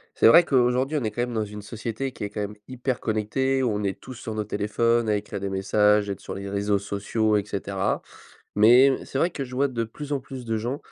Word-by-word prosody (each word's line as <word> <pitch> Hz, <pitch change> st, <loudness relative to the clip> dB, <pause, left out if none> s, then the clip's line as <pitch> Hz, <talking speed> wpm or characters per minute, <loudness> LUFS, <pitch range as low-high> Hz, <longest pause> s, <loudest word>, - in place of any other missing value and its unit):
C'est -, -, +4 dB
vrai 165 Hz, +10 st, +8 dB
qu'aujourd'hui 130 Hz, +1 st, +2 dB
on 130 Hz, -, -3 dB
est 110 Hz, -, 0 dB
quand 120 Hz, +3 st, -2 dB
même 120 Hz, -1 st, -3 dB
dans 110 Hz, -1 st, 0 dB
une 105 Hz, 0 st, -8 dB
société 115 Hz, +4 st, -4 dB
qui -, -, -6 dB
est 100 Hz, -, -4 dB
quand 105 Hz, -, -5 dB
même 105 Hz, 0 st, -4 dB
hyper 130 Hz, 0 st, -3 dB
connectée, 130 Hz, +5 st, 0 dB
où 125 Hz, -, +1 dB
on 105 Hz, 0 st, -2 dB
est 95 Hz, -1 st, -2 dB
tous 130 Hz, -, -9 dB
sur 115 Hz, -2 st, -6 dB
nos 110 Hz, 0 st, -2 dB
téléphones 110 Hz, +3 st, +1 dB
à 105 Hz, -, +3 dB
écrire 100 Hz, -1 st, -5 dB
des 100 Hz, 0 st, -3 dB
messages, 105 Hz, +1 st, +2 dB
être 100 Hz, -, -5 dB
sur -, -, -7 dB
les 100 Hz, 0 st, -6 dB
réseaux 100 Hz, 0 st, 0 dB
sociaux 105 Hz, +2 st, 0 dB
et 100 Hz, -, 0 dB
cetera. 100 Hz, -1 st, -2 dB, 0.5 s
Mais, 125 Hz, +6 st, +6 dB
c'est 135 Hz, -, -4 dB
vrai 170 Hz, -, +2 dB
que 140 Hz, -5 st, -4 dB
je 125 Hz, -1 st, -9 dB
vois 140 Hz, +2 st, +2 dB
de 120 Hz, -3 st, -2 dB
plus 145 Hz, +6 st, -8 dB
en 140 Hz, -, 0 dB
plus 130 Hz, -1 st, -9 dB
de 115 Hz, -1 st, -1 dB
gens, 120 Hz, +6 st, -3 dB
110 Hz, 255 wpm, -25 LUFS, 105-130 Hz, 0.5 s, vrai